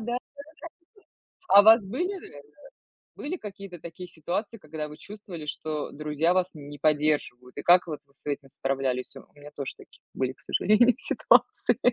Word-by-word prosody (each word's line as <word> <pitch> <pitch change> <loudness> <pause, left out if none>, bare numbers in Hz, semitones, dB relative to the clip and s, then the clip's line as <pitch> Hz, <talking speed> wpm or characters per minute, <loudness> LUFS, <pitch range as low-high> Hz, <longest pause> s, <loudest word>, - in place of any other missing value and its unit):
да. 240 +2 -2 1.3
А 200 - +9
у - - -3
вас 225 +1 +8
были 255 - -2
реально, 145 - -13 0.7
были 320 +6 -4
какие-то 195 - -9
такие 170 +3 -9
ситуации, 175 +7 -4
когда 155 -3 -6
вы 150 - -11
чувствовали, 195 -6 -9
что 150 0 -4
друзья 150 +3 0
вас 185 0 +1
не 145 -1 -9
поддерживают, 145 -4 0
и - - -5
как 180 +1 +6
вот 155 -4 -5
вы 140 - -30
с 140 - -18
этим 140 -1 -4
справлялись? 135 -1 -2
У - - -8
у 145 - -18
меня 145 +1 -11
тоже 140 -2 -4
такие - - -18
были, 130 -1 -1
к - - -27
сожалению, 235 +4 +4
ситуации. - - +3
155 Hz, 170 wpm, -27 LUFS, 145-195 Hz, 1.3 s, А